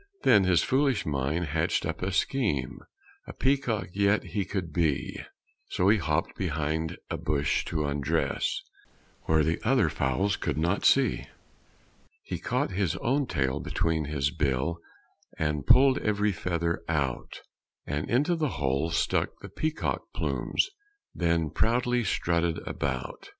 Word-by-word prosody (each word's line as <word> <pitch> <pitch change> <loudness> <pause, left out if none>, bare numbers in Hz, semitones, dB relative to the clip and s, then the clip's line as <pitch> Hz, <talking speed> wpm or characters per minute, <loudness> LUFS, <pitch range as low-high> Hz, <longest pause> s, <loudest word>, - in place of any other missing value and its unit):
Then 100 -2 +6
his 90 -2 +3
foolish 135 -3 +1
mind 75 +4 -1
hatched 80 +2 0
up - - -4
a 95 +2 -1
scheme 95 - 0 0.5
A - - -7
peacock 125 -9 0
yet 100 +1 +2
he 100 -3 -3
could 90 -4 -4
be; 80 -5 0 0.5
So 90 +2 +2
he 105 0 +4
hopped 80 0 -1
behind 80 -2 -2
a - - -1
bush 75 -1 0
to 75 -3 -1
undress 70 -1 -1 0.6
Where 80 -1 +3
the 80 +2 0
other - - +3
fowls 95 +10 0
could - - -2
not 85 +5 0
see. 135 -6 +3 1.0
He - - -5
caught - - -1
his 90 -2 0
own 135 +3 0
tail 65 -7 0
between 80 -2 -1
his 70 -1 -1
bill, 75 +2 -1 0.6
And 75 -3 -1
pulled 135 0 +6
every 105 0 +1
feather 85 -1 -2
out; 70 -6 -2 0.4
And 75 +1 -3
into 145 +9 +2
the 155 -4 -2
holes 70 +4 0
stuck - - +1
the - - -8
peacock 155 0 -2
plumes; - - 0 0.5
Then 85 -3 0
proudly 120 +3 +1
strutted 85 -4 0
about. 65 -3 -4
85 Hz, 140 wpm, -28 LUFS, 75-105 Hz, 1.0 s, Then